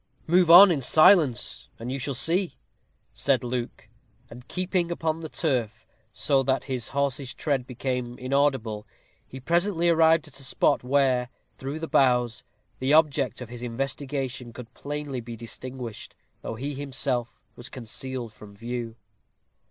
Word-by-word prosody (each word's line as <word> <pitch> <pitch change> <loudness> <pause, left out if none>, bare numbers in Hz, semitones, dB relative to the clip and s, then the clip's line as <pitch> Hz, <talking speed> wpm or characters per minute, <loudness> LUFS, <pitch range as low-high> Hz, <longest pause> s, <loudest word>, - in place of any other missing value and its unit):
"Move 175 +1 +3
on 180 +3 +10
in 150 -5 0
silence, 155 - +4
and 120 +2 -6
you 135 - -3
shall 135 +1 -3
see," 175 +7 +2 0.6
said 135 -2 +1
Luke; 120 -1 -4 0.4
and 125 +1 -12
keeping 180 -1 -1
upon 165 -1 -2
the 160 -1 -7
turf, 120 -10 -2 0.3
so 135 +5 +1
that 135 0 0
his 130 -3 -3
horse's 140 -2 -2
tread 135 -5 -1
became 125 -1 -4
inaudible, 130 -5 0 0.4
he 130 - -9
presently 170 +4 +1
arrived 160 -1 +4
at 135 -2 -11
a - - -10
spot 130 - +1
where, 130 -2 +2 0.3
through 140 +4 -5
the 165 - -4
boughs, 125 -4 +2 0.4
the 130 +2 0
object 150 -5 +2
of 125 - -7
his 120 0 -9
investigation 130 0 -4
could 120 -1 -11
plainly 145 -2 -5
be 115 0 -8
distinguished, 120 0 -7 0.3
though - - -5
he 140 +6 -4
himself 130 -3 -3
was 120 - -8
concealed 125 -1 -5
from 105 -2 -14
view. 115 +1 -5
130 Hz, 145 wpm, -26 LUFS, 120-150 Hz, 0.6 s, on